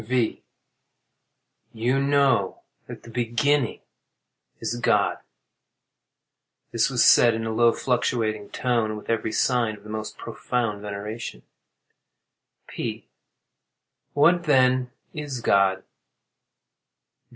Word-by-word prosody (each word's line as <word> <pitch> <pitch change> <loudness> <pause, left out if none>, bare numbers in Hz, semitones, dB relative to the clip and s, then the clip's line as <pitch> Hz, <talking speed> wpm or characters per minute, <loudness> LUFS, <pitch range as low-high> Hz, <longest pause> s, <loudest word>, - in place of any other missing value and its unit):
V. 120 0 -1 1.3
You 120 +4 0
know 140 -8 +1 0.2
that - - -10
the 115 - -12
beginning 120 +3 0 0.8
is - - -3
GOD. - - +1 1.5
[This - - +2
was - - +3
said 120 -2 +6
in 115 0 -3
a 110 - -2
low, 115 +1 +4
fluctuating 115 -4 -1
tone, 120 -3 0
and 110 - -4
with 105 - -5
every 115 -1 -1
sign 115 -3 +1
of 100 - -19
the 105 - -10
most 110 0 -5
profound 115 -5 -3
veneration.] 105 - -6 1.2
P. - - -6 1.1
What 170 +4 +4
then, 130 -3 +3 0.2
is 145 -4 -5
God? 95 -4 +2
115 Hz, 105 wpm, -24 LUFS, 110-130 Hz, 1.5 s, said